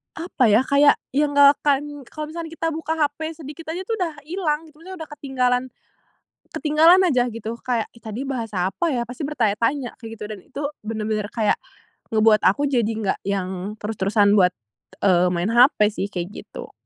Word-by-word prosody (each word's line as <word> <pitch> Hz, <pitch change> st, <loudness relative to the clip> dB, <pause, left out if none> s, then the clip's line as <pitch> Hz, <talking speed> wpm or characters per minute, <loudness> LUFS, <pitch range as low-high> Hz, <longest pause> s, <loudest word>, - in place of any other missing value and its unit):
apa 315 Hz, -7 st, +1 dB
ya, 215 Hz, +4 st, +5 dB
kayak 280 Hz, +2 st, +5 dB, 0.2 s
yang 290 Hz, +2 st, +1 dB
nggak 285 Hz, 0 st, +7 dB
akan 290 Hz, 0 st, -1 dB
kalau 305 Hz, 0 st, -7 dB
misalnya 330 Hz, 0 st, -6 dB
kita 330 Hz, -, -2 dB
buka 320 Hz, +1 st, -3 dB
HP 295 Hz, -1 st, 0 dB, 0.2 s
sedikit 310 Hz, +2 st, -10 dB
aja 370 Hz, -, -4 dB
tuh 450 Hz, +3 st, -2 dB
udah 340 Hz, -3 st, -1 dB
hilang 320 Hz, -3 st, -1 dB
gitu. 305 Hz, 0 st, -20 dB
Misalnya 365 Hz, 0 st, -8 dB
udah 310 Hz, -, -13 dB
ketinggalan 255 Hz, -3 st, 0 dB, 0.9 s
ketinggalan 320 Hz, +4 st, +5 dB
aja 250 Hz, -8 st, +2 dB
gitu. 230 Hz, 0 st, -6 dB
Kayak, 240 Hz, -3 st, -1 dB
"Ih 230 Hz, -, -18 dB
tadi 220 Hz, +4 st, -5 dB
bahas 245 Hz, -5 st, -3 dB
apa 190 Hz, -, 0 dB
ya?" 245 Hz, -5 st, 0 dB
Pasti 245 Hz, +4 st, -9 dB
bertanya-tanya 240 Hz, 0 st, 0 dB
kayak 225 Hz, -2 st, -9 dB
gitu. 210 Hz, -, -8 dB
Dan 215 Hz, -2 st, -7 dB
itu 285 Hz, -, -7 dB, 0.2 s
benar-benar 215 Hz, -1 st, -3 dB
kayak 215 Hz, -2 st, +1 dB, 0.6 s
ngebuat 215 Hz, -1 st, +4 dB
aku 285 Hz, +10 st, +3 dB
jadi 240 Hz, -5 st, +1 dB
enggak 220 Hz, -3 st, -2 dB
yang 190 Hz, 0 st, -3 dB
terus-terusan 205 Hz, -1 st, +2 dB
buat, 180 Hz, -1 st, +4 dB, 0.5 s
eee, 180 Hz, -2 st, +4 dB
main 175 Hz, +5 st, -1 dB
HP 245 Hz, +5 st, +5 dB, 0.2 s
sih, 200 Hz, -, -2 dB
kayak 180 Hz, -2 st, -4 dB, 0.2 s
gitu. -, -, -10 dB
250 Hz, 180 wpm, -22 LUFS, 215-300 Hz, 0.9 s, nggak